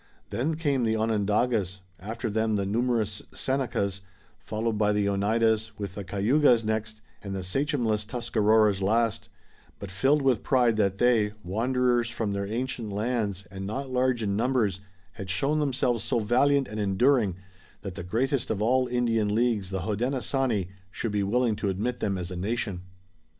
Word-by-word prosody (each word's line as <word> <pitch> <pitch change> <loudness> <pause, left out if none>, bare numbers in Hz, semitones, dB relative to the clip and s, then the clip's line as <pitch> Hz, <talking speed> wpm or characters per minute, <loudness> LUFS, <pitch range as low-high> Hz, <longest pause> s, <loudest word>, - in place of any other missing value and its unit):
Then 150 +7 -1
came 145 -5 0
the 110 -1 +1
Onondagas, 105 -2 0 0.2
after 115 +5 -4
them 110 0 0
the 100 -1 0
numerous 110 -1 0
Senecas, 120 -8 -1 0.4
followed 110 +1 -2
by 105 0 +2
the 105 -1 +1
Oneidas, 110 +2 +1
with 100 -3 -5
the 100 - -6
Cayugas 115 +5 +3
next 110 0 -3 0.2
and 100 -2 -5
the 95 - -4
sachemless 115 0 0
Tuscaroras 110 -3 +2
last, 110 +2 +1 0.5
but 100 -2 -8
filled 135 +10 +2
with 130 -5 +2
pride 125 -4 +3
that 100 -2 +1
they, 110 -3 +3
wanderers 120 +4 +1
from 115 -4 -2
their 100 0 -2
ancient 115 -1 -3
lands, 105 -3 -2
and 95 0 -6
not 130 +5 -4
large 125 -2 +1
in 100 -1 0
numbers, 115 -4 +1 0.3
had 95 -1 -8
shown 145 +10 +1
themselves 130 -5 0
so 125 - 0
valiant 130 +5 +3
and 110 +1 -6
enduring 105 0 +2 0.5
that 100 -2 -5
the 90 - -7
greatest 125 +8 -1
of 110 - -1
all 125 +4 +2
Indian 115 -4 +1
leagues, 115 -5 +1
the 95 -1 -3
Hodenosaunee, 120 0 -1 0.2
should 110 +3 -3
be 105 0 0
willing 115 +3 +1
to 100 - -1
admit 110 +6 -2
them 100 -2 -1
as 90 0 -5
a - - -4
nation. 100 0 -2
110 Hz, 160 wpm, -27 LUFS, 100-125 Hz, 0.5 s, Cayugas